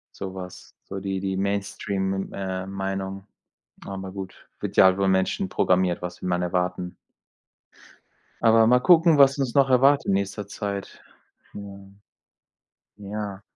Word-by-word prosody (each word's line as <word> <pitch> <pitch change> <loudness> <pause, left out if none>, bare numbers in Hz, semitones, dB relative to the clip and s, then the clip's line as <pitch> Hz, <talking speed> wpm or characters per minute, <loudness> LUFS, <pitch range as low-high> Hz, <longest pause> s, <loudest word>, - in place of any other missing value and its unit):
Sowas, 95 -1 -8
so 95 - -6
die 95 -1 -3
die 95 0 -2
Mainstream, 100 0 -2
M - - -12
,äh, 95 -1 -4
Meinung. 95 0 -4 0.6
Aber 95 -1 -6
gut, 95 -1 -7 0.2
wird - - -5
ja - - +8
halt 95 0 +4
von 100 0 +1
Menschen 95 - 0
programmiert, 90 - +1
was 90 0 -6
will - - -4
man 90 0 0
erwarten. 90 0 -2 1.5
Aber 115 0 +5
mal 125 +2 +5
gucken, 165 +3 +5
was 135 0 +6
uns 135 -4 -1
noch 135 -1 +4
erwartet 135 +3 +4
in - - +2
nächster 100 +1 -2
Zeit. 100 -1 -6 0.5
Ja. 100 -1 -9 1.2
Ja. 100 -1 -6
95 Hz, 140 wpm, -24 LUFS, 95-105 Hz, 1.5 s, ja